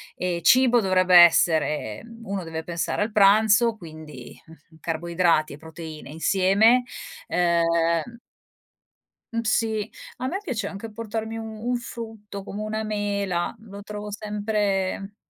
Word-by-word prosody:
e 180 -1 -2
cibo 250 -1 +5
dovrebbe 185 -3 +3
essere 160 -8 +4 0.2
uno 195 -4 -4
deve 160 0 -5
pensare 170 +3 -2
al 215 +2 -1
pranzo 215 +3 +4
quindi, 155 - -11
uhm, 160 0 -19
carboidrati 170 -1 0
e - - -10
proteine 160 -1 -10
insieme, 195 +9 +3 0.4
uhm 170 +4 +1 1.1
Uhm, 230 - 0
sì. 220 -1 0 0.3
A 255 - -3
me 370 +8 -2
piace 225 - -3
anche 205 +3 -8
portarmi 225 +1 -5
u 225 - -5 0.3
un 250 - +1
frutto 220 -4 -8
come 205 +1 -7
una 215 +1 -3
mela, 200 -4 -2
lo 200 -2 -11
trovo 210 0 -7
sempre. 205 -2 -2
200 Hz, 125 wpm, -24 LUFS, 170-220 Hz, 1.1 s, cibo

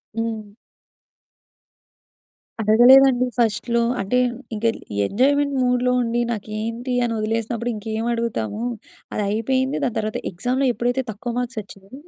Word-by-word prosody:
హ్మ్. 225 -2 -3 2.1
అడగలేదండి 250 +4 +6
ఫస్ట్‌లో. 235 +1 +1 0.2
అంటే, 250 +6 +1 0.4
ఇంక 210 - -7 0.4
ఎంజాయ్‌మెంట్ 280 +4 +2
మూడ్‌లో 250 0 +2
ఉండి 235 +1 0
నాకేంటి 230 +3 -4
అని 230 - -1
వదిలేసినప్పుడు 230 +2 -2
ఇంకేమి 220 +2 -3
అడుగుతాము. 230 - -2 0.5
అది 210 - -1
అయిపోయింది. 260 +5 0
దాని 245 - -1
తర్వాత 215 0 -2
ఎగ్జామ్‌లో 250 +9 0
ఎప్పుడైతే 245 +3 -1
తక్కువ 225 +3 -5
మార్క్స్ 245 -2 -3
వచ్చాయో 195 +1 -16
235 Hz, 110 wpm, -22 LUFS, 215-250 Hz, 2.1 s, అడగలేదండి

